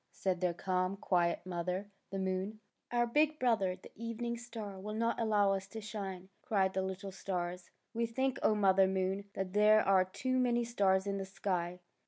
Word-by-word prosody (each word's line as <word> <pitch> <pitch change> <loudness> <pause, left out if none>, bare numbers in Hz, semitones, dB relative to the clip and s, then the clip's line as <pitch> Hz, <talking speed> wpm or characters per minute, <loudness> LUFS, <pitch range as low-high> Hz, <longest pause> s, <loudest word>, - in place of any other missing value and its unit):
'' - - -47
said 185 -2 +1
their 180 -1 +2
calm, 185 +1 0
quiet 175 -3 +1
mother, 185 +3 -3 0.2
the 195 - -4
moon. 190 +3 -2 0.3
Our 240 0 +3
big 300 +5 +2
brother, 220 -8 +2
the 185 - -15
evening 230 +1 -3
star, 225 -5 -7
will 210 +2 -5
not 230 +1 0
allow 205 -3 +3
us 195 0 -3
to 220 +3 -7
shine! 195 -3 -6
" - - -41
cried 190 -3 +2
the 190 - 0
little 190 +1 -4
stars. 180 -2 -4
'' - - -49
We 230 0 0
think, 260 +3 -1
O 215 - +4
Mother 195 -2 +5
Moon, 190 +1 -1
that 190 -1 -3
there 210 +1 +6
are 190 -1 +6
too 255 +7 -1
many 240 -1 +2
stars 195 -5 +2
in 200 0 -1
the 195 - -3
sky." 180 -2 -2
195 Hz, 200 wpm, -34 LUFS, 185-225 Hz, 0.3 s, there